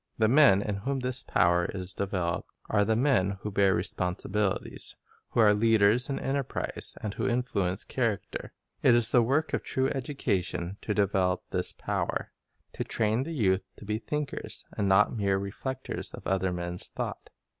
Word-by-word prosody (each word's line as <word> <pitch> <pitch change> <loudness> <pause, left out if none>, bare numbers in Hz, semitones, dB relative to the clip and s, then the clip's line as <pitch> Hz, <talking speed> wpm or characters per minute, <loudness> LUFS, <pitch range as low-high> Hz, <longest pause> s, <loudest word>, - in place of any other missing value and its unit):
The 110 - +3
men 120 -6 +6
in 105 -2 -2
whom 135 +6 -2
this 125 0 -1
power 85 0 +2
is 90 -1 -2
developed 95 -4 -2 0.2
are 105 -1 +4
the 110 +2 +1
men 110 -7 +2
who 105 - -4
bear 95 -1 +3
responsibilities, 95 +2 -1 0.3
who 120 - +2
are 105 -2 +6
leaders 110 +2 +4
in 135 - -1
enterprise, 135 -1 -2
and 105 -2 -3
who - - -2
influence 100 -7 0
character. 115 -6 -2 0.3
It 120 - +6
is 115 -1 +5
the 120 - +6
work 140 +7 +1
of - - +1
true 130 0 0
education 100 -9 -2
to 105 - -2
develop 95 -3 +1
this - - -1
power; - - -2 0.4
to - - -3
train 110 +2 +1
the 165 - -5
youth 95 -7 +2
to - - -12
be 105 +1 -2
think 150 +3 -3
ers, - - -5
and 100 - 0
not 105 +5 +4
mere 100 -3 +1
reflectors 125 +7 -4
of - - -13
other 95 -1 +1
men's 90 0 -3
thought. - - -5
105 Hz, 170 wpm, -28 LUFS, 95-125 Hz, 0.4 s, men